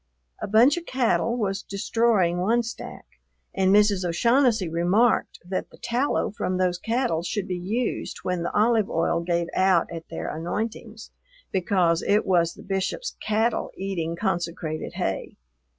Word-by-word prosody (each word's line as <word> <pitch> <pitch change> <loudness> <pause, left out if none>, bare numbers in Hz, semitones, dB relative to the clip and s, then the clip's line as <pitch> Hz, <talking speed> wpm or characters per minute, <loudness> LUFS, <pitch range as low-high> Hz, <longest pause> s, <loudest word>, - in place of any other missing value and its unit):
A - - -3
bunch 235 - +5
of 340 - -6
cattle 240 -2 +1
was 200 -3 -1
destroying 200 -3 +1
one 230 +6 +2
stack, 235 - -8 0.5
and 190 -1 +2
Mrs. 205 -2 +4
O'Shaughnessy 230 +4 +2
remarked 175 +8 +2
that 185 +1 -3
the - - -17
tallow 245 +1 0
from 185 -2 -2
those 180 -1 0
cattle 225 -7 0
should 190 +3 -3
be 180 - -2
used 220 +7 -2
when 180 -1 -1
the 170 - -2
olive 220 -1 +2
oil 165 +1 +1
gave 170 0 0
out 185 -3 +3
at 165 0 -8
their 165 - -5
anointings, 215 +6 -5 0.4
because 180 -3 +2
it 205 +1 +2
was 170 -3 +2
the - - -12
Bishop's 195 - -3
cattle 220 +2 0
eating 175 -4 -3
consecrated 170 -2 -3
hay. - - -3
195 Hz, 150 wpm, -25 LUFS, 175-225 Hz, 0.5 s, bunch